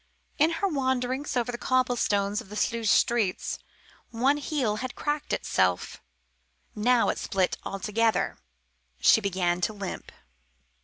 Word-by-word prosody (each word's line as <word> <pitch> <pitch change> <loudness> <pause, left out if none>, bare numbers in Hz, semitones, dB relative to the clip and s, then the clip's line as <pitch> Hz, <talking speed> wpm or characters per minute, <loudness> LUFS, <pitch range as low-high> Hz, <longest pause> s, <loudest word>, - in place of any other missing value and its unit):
In 320 +3 +4
her 395 +4 0
wanderings 260 -3 -1
over 245 0 0
the 240 - -6
cobblestones 235 -5 +1
of 225 - -14
Sluys 230 -2 0
streets 220 -6 +1 0.5
one 260 +5 +2
heel 275 -7 -1
had 255 +2 -5
cracked 295 0 -2
itself. - - 0 0.7
Now 235 +3 +3
it - - -1
split 190 -2 0
altogether. 215 +3 0 0.6
She 220 - +5
began 180 -3 0
to 215 - 0
limp. 200 -2 -6
235 Hz, 120 wpm, -27 LUFS, 205-260 Hz, 0.7 s, She